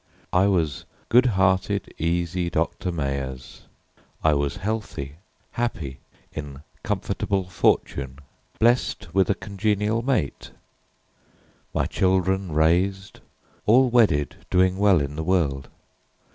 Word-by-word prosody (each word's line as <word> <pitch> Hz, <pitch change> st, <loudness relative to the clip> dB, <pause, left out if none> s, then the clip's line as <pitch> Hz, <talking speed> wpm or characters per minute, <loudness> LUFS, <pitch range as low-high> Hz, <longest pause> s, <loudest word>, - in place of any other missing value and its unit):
I 95 Hz, +2 st, +4 dB
was 85 Hz, -7 st, 0 dB, 0.2 s
good 125 Hz, +2 st, +5 dB
hearted, 95 Hz, -1 st, +1 dB
easy 85 Hz, +2 st, -1 dB
Doctor 85 Hz, +2 st, -1 dB
Meyers. 70 Hz, -5 st, -5 dB, 0.6 s
I 80 Hz, -, +4 dB
was 70 Hz, -1 st, 0 dB
healthy, 100 Hz, -9 st, -4 dB, 0.3 s
happy, 80 Hz, -, -3 dB, 0.3 s
in 75 Hz, -2 st, -7 dB, 0.2 s
comfortable 95 Hz, -2 st, -2 dB
fortune, 70 Hz, -6 st, 0 dB, 0.4 s
Blest 115 Hz, -6 st, +1 dB
with 95 Hz, -1 st, +3 dB
a 100 Hz, -, +3 dB
congenial 105 Hz, +2 st, -1 dB
mate, 125 Hz, -, -1 dB, 1.2 s
my -, -, 0 dB
children 95 Hz, 0 st, +1 dB
raised, 90 Hz, +5 st, +1 dB, 0.5 s
All 125 Hz, +3 st, +5 dB
wedded, 105 Hz, -, +3 dB
doing 95 Hz, +1 st, +2 dB
well 100 Hz, -6 st, +5 dB
in 70 Hz, +1 st, -4 dB
the 80 Hz, -, -3 dB
world. 75 Hz, -7 st, 0 dB
90 Hz, 105 wpm, -24 LUFS, 75-100 Hz, 1.2 s, good